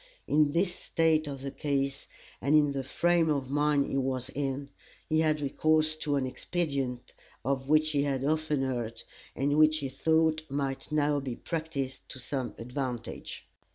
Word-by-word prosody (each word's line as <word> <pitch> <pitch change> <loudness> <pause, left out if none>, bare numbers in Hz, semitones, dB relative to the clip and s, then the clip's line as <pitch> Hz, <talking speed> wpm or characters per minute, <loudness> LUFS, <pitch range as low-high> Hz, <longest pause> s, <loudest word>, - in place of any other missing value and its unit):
In 150 0 +4
this 175 +4 +1
state 160 -3 +1
of 135 -2 -6
the 140 - -3
case, 140 -2 -2 0.3
and 140 +3 +3
in 150 -2 +5
the 135 -1 -2
frame 170 +4 +2
of 135 -3 -1
mind 145 -1 +3
he - - -2
was 130 -1 -2
in, 140 0 -3 0.4
he 155 0 +2
had 155 -1 +2
recourse 155 +2 +2
to 150 -2 -1
an 135 -2 +1
expedient 135 -2 -2 0.3
of 135 0 -1
which 155 0 +4
he 145 -2 +2
had 135 -2 0
often 150 -1 +1
heard, 120 -3 -3 0.3
and 145 +3 +1
which 155 0 +6
he 140 -3 -3
thought 160 +3 +2
might 135 0 -3
now 145 -1 +2
be 130 -3 -4
practised 155 -5 -4
to - - -6
some 130 0 -4
advantage. 125 -1 -5
145 Hz, 165 wpm, -29 LUFS, 135-155 Hz, 0.4 s, which